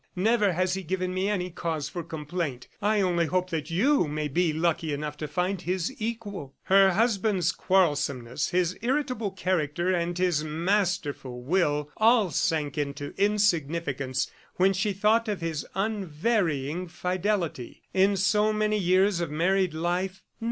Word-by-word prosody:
Never 210 0 +2
has 185 +2 0
he 190 - -2
given 185 +1 -2
me 190 +2 0
any 180 -3 -1
cause 165 -4 -3
for 175 - -5
complaint. 155 -4 -4
I 210 0 +2
only 175 -3 +1
hope 185 +1 -1
that 155 -1 -3
you 210 - +3
may 150 0 -2
be 170 +3 +1
lucky 160 0 0
enough 150 +1 -4
to 155 - -4
find 180 +5 -1
his 185 +6 -2
equal." 205 - -5
Her 195 0 +5
husband's 200 -4 +2
quarrelsomeness, 145 -11 +1
his 180 -1 +1
irritable 250 -3 -1
character 180 -2 0
and 175 0 -1
his 180 -4 +1
masterful 160 -6 -1
will 150 -2 +1
all 220 -4 +4
sank 150 0 0
into 145 0 -4
insignificance 170 -10 +1 0.3
when 190 +2 +3
she 190 +2 0
thought 215 +4 +2
of 210 -3 -2
his 165 -3 -3
unvarying 180 - -1
fidelity. 180 - -2
In 195 +1 +3
so 210 +3 +3
many 215 0 +1
years 185 +1 +3
of 170 - -2
married 180 +2 +1
life 180 +3 -2
180 Hz, 145 wpm, -27 LUFS, 155-195 Hz, 0.3 s, Her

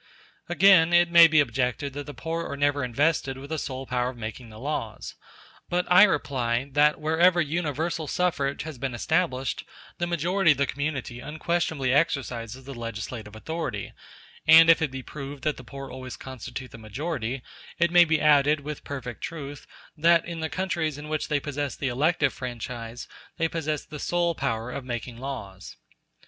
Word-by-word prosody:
Again, 175 -2 +6
it 175 0 +5
may 170 -1 +10
be 155 -1 +4
objected 130 +1 0
that 145 +1 -6
the 145 - -6
poor 165 +4 -3
are 140 - -4
never 145 -1 +1
invested 135 +2 +1
with 140 +3 -10
the 160 - -1
sole 135 -1 -5
power 125 -1 0
of 130 - -9
making 115 +1 -7
the 110 - -12
laws; 120 -4 -4 0.6
but 180 0 +1
I 180 - +9
reply, 130 - 0
that 150 +2 +4
wherever 165 +3 +3
universal 160 0 -1
suffrage 140 -7 0
has 155 -5 -8
been 130 -1 -3
established 130 -1 0 0.4
the 175 - 0
majority 170 0 +3
of - - -12
the 140 - +2
community 140 -3 -3
unquestionably 155 -1 -1
exercises 130 -5 -1
the 140 +1 -8
legislative 115 -2 -6
authority; 160 +8 -4 0.5
and 165 +1 +9
if 165 - +3
it 160 - +1
be 130 0 -7
proved 140 0 -8
that 150 - 0
the 125 - -10
poor 135 +2 -8
always 130 0 -7
constitute 130 0 -8
the 115 - -11
majority, 125 - -4 0.3
it 170 -1 +2
may 175 0 +8
be 155 -2 +2
added, 150 0 +4
with 150 +1 -6
perfect 125 -5 -6
truth, 145 -3 -7 0.3
that 165 +1 +4
in 170 -1 -6
the 160 0 -2
countries 175 -6 -2
in 150 +1 -8
which 155 -1 -1
they 150 -1 +1
possess 145 -1 -3
the 135 - -2
elective 145 +2 +2
franchise 120 -1 -6 0.3
they 165 -1 +2
possess 155 -2 -3
the 150 -1 -8
sole 175 +1 +1
power 115 -5 -2
of 135 - -5
making 120 -1 -5
laws. 125 -8 -7
145 Hz, 175 wpm, -26 LUFS, 125-160 Hz, 0.6 s, may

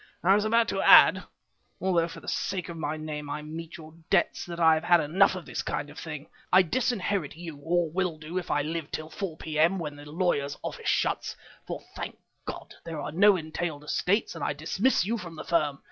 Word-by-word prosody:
"I 190 +3 +6
was 205 +1 +2
about 230 +1 +3
to - - -1
add, - - +7 0.5
although 175 -3 +2
for 165 - -10
the - - -14
sake 185 -3 -2
of 170 - -6
my 155 -1 -3
name 150 -1 -5
I 150 +1 -4
meet 165 +3 -7
your 155 -1 -12 0.2
debts, - - +1
that 170 -1 -6
I 160 -1 +6
have 160 +1 0
had 175 0 +5
enough 185 +6 +3
of 185 - -7
this - - -4
kind 145 - -3
of 150 - -10
thing. 155 -3 -6 0.3
I 185 +1 +7
disinherit 200 - -1
you, 165 -3 -8
or 170 +3 +1
will 175 0 -1
do 160 +4 -4
if 180 - -9
I 145 0 +1
live 160 0 -4
till 155 0 -5
4 185 -6 -5
p.m. 160 +4 +1
when 150 -4 -5
the 145 0 -11
lawyer's 150 -5 0
office - - -3
shuts, - - 0 0.3
for - - -5
thank - - -6 0.3
God! - - -7
there 165 -2 -5
are - - -4
no 200 +5 +6
entailed 155 -2 -4
estates, 185 +7 0
and 165 - -6
I - - 0
dismiss 170 - +1
you 230 +3 -1
from 170 -4 -8
the - - -7
firm. 150 -5 +1
165 Hz, 220 wpm, -28 LUFS, 155-185 Hz, 0.5 s, add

